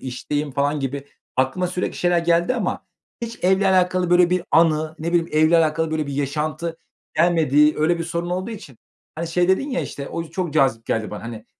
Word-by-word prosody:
işteyim 145 Hz, +4 st, -3 dB
falan 145 Hz, +2 st, 0 dB
gibi 135 Hz, +1 st, -4 dB, 0.3 s
aklıma 130 Hz, +8 st, +1 dB
sürekli 180 Hz, +1 st, -3 dB
şeyler 175 Hz, -1 st, +2 dB
geldi 170 Hz, +6 st, +2 dB
ama -, -, -3 dB, 0.4 s
hiç 230 Hz, 0 st, -5 dB
evle 190 Hz, +1 st, +3 dB
alakalı, 185 Hz, -1 st, +2 dB
böyle, 175 Hz, 0 st, +5 dB
bir 180 Hz, -1 st, +1 dB
anı 160 Hz, -1 st, +3 dB
ne 160 Hz, +2 st, -3 dB
bileyim, 170 Hz, -1 st, +2 dB
evle 155 Hz, +2 st, +4 dB
alakalı, 160 Hz, 0 st, +1 dB
böyle, 155 Hz, -1 st, -1 dB
bir 140 Hz, -, -5 dB
yaşantı 155 Hz, +4 st, -2 dB, 0.4 s
gelmedi 155 Hz, -3 st, +4 dB
öyle 170 Hz, +3 st, +2 dB
bir 165 Hz, -, -3 dB
sorun 170 Hz, +1 st, -3 dB
olduğu 185 Hz, +5 st, -3 dB
için... 195 Hz, -, -10 dB, 0.4 s
Hani, 165 Hz, +2 st, -4 dB
şey 175 Hz, +2 st, +1 dB
dedin 275 Hz, +10 st, +1 dB
ya, 260 Hz, -, -1 dB
işte, 140 Hz, -, -6 dB
"O 165 Hz, -, -4 dB
çok 175 Hz, -1 st, -4 dB
cazip 130 Hz, -6 st, +2 dB
geldi 110 Hz, -1 st, -1 dB
bana. -, -, -7 dB
Hani, 115 Hz, -1 st, -8 dB
165 Hz, 195 wpm, -22 LUFS, 145-175 Hz, 0.4 s, böyle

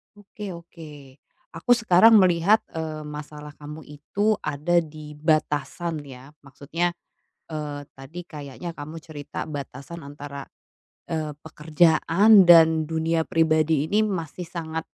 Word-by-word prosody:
Oke 205 Hz, -2 st, -9 dB
oke, 150 Hz, -5 st, -13 dB, 0.4 s
aku 165 Hz, +9 st, -1 dB
sekarang 225 Hz, 0 st, +6 dB
melihat, 185 Hz, +4 st, +4 dB
eee, 155 Hz, -2 st, -5 dB
masalah 150 Hz, 0 st, -9 dB
kamu 150 Hz, +1 st, -9 dB
itu 200 Hz, +9 st, -1 dB
ada 155 Hz, +4 st, +1 dB
di 150 Hz, -1 st, -11 dB
batasan 155 Hz, +1 st, -1 dB
ya 135 Hz, +1 st, -12 dB
maksudnya, 145 Hz, +5 st, -3 dB, 0.6 s
eee, 150 Hz, -2 st, -4 dB
tadi 135 Hz, +6 st, -10 dB
kayaknya 150 Hz, +3 st, -8 dB
kamu 150 Hz, +2 st, -8 dB
cerita 145 Hz, -3 st, -7 dB
batasan 145 Hz, +3 st, -7 dB
antara, 140 Hz, -1 st, -8 dB, 0.6 s
eee, 155 Hz, -2 st, -3 dB
pekerjaan 165 Hz, +6 st, +4 dB
dan 160 Hz, -2 st, +7 dB
dunia 160 Hz, 0 st, 0 dB
pribadi 160 Hz, -2 st, +2 dB
ini 215 Hz, +1 st, +2 dB
masih 180 Hz, -3 st, -4 dB
sangat, 160 Hz, -1 st, -5 dB
160 Hz, 115 wpm, -24 LUFS, 150-170 Hz, 0.6 s, dan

